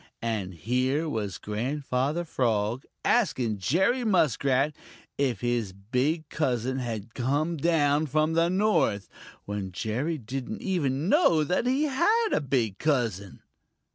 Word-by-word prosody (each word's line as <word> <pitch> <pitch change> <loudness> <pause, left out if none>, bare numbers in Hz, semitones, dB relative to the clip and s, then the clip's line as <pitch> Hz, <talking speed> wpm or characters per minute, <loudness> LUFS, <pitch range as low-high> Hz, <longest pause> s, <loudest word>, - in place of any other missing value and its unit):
And 105 -6 -2
here 130 - 0
was 105 - -3
Grandfather 135 +7 -2
Frog 115 -4 0 0.2
asking 125 - +1
Jerry 190 - +2
Muskrat 145 - +2 0.4
if 125 -8 0
his 120 -5 -1
big 130 - -1
cousin 130 -3 -1
had 115 -3 -5
come 145 +7 0
down 155 -1 +2
from 155 +3 +1
the 165 +1 +3
North, 185 - +1 0.4
when 100 -2 -4
Jerry 125 - -2
didn't 125 +1 -6
even 150 -6 0
know 200 - +4
that 180 +10 0
he 265 +4 +2
had 380 - +2
a - - +2
big 125 -8 -1
cousin. 115 - -1
135 Hz, 125 wpm, -27 LUFS, 115-165 Hz, 0.4 s, know